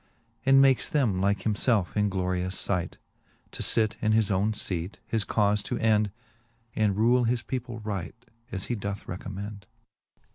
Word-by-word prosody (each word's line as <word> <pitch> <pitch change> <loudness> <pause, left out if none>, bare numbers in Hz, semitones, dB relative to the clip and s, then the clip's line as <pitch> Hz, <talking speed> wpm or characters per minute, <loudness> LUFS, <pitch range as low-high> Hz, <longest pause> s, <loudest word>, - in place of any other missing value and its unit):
And 135 0 +7
makes 135 -2 +4
them 115 -11 +1
like 100 +1 +1
himfelfe 105 -2 +1
in 105 -1 +2
glorious 90 -1 -1
iight. 90 -3 -1 0.6
To - - -6
fit 110 -1 +1
in 110 -1 +2
his 110 -2 +2
owne 100 +3 +2
feate, 90 -2 -3
his 110 -2 -1
caufe 105 -1 +2
to - - -2
end, 105 -2 +3 0.7
And 105 -2 +1
rule 120 +3 +4
his 115 0 0
people 120 +1 -4
right, 100 -4 -4 0.4
as 95 -1 -3
he - - -2
doth 100 -2 -4
recommend. 100 +1 -6
105 Hz, 155 wpm, -27 LUFS, 95-115 Hz, 0.7 s, And